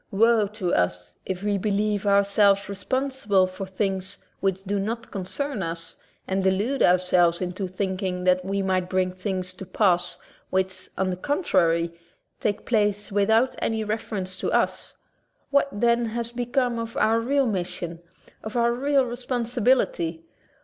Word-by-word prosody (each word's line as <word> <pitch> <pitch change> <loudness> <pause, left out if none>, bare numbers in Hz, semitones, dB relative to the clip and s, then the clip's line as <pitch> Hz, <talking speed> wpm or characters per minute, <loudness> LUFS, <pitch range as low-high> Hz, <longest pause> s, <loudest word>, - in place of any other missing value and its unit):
Woe 225 +1 +4
to 195 -4 -3
us 90 0 0
if 190 0 -3
we 205 -1 +1
believe 205 0 0
ourselves 200 0 +4
responsible 205 0 0
for 185 +1 -6
things 190 0 -2 0.2
which 195 -1 -1
do 200 +1 -1
not 230 +4 -4
concern 215 +6 -3
us 165 -1 -5 0.3
and 190 0 0
delude 205 +9 +1
ourselves 180 -1 +4
into 185 +1 -3
thinking 185 -1 -2
that 185 0 +3
we 195 +1 -1
bring 185 0 0
things 185 -1 -3
to 185 - -9
pass 180 -2 +1 0.3
which, 185 0 -1
on 190 0 +1
the - - -2
contrary, 175 - +1 0.5
take 205 -1 -1
place 210 -2 +1
without 220 +5 +3
any 220 -1 -1
refer 215 +1 -3
ence 185 -1 -3
to - - -2
us. - - 0 0.6
What, 280 0 +3
then, 235 +2 +2
has 235 +1 -3
become 245 0 0
of 230 0 -5
our 225 +1 +3
real 275 +4 +2
mission, 175 -5 -3 0.4
of 220 +2 -4
our 235 0 +3
real 275 +2 +2
responsibility? 240 -8 0
200 Hz, 145 wpm, -25 LUFS, 185-230 Hz, 0.6 s, Woe